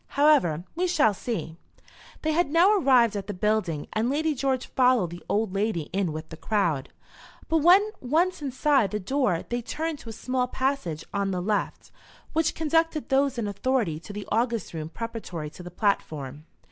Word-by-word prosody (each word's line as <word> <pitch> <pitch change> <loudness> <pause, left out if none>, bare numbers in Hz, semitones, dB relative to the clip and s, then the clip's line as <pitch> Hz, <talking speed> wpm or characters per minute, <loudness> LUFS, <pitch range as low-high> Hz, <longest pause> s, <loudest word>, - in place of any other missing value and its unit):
However, 280 - +4
we 360 +2 +1
shall 305 -12 +3
see." 195 -6 -4 0.7
They 315 - +1
had 330 -1 +1
now 345 +7 +5
arrived 255 - +4
at 195 -1 -4
the 205 - -4
building, 185 -6 0
and 220 +3 +1
Lady 310 +3 +1
George 265 -1 -1
followed 250 -9 +2
the 175 0 -8
old 210 -2 0
lady 195 -6 -1
in 190 -3 0
with 155 +1 -7
the 160 - -9
crowd. 170 -10 0 0.6
But 325 - +2
when 365 +7 +6
once 335 +7 +1
inside 270 -4 +2
the 210 - -2
door 210 -4 0
they 240 0 -1
turned 310 +5 -3
to 230 - -10
a - - -5
small 250 +3 -1
passage 260 - -2
on 200 -1 0
the 185 -2 -1
left, 205 +3 -2 0.4
which 320 -1 +1
conducted 325 0 +1
those 270 -1 +2
in 225 -3 -1
authority 205 -5 0
to 170 - -10
the 205 0 -7
august 230 -1 0
room 155 -1 -5
preparatory 180 -8 -6
to - - -11
the 175 - -8
platform. 155 - -2
230 Hz, 180 wpm, -26 LUFS, 185-285 Hz, 0.7 s, when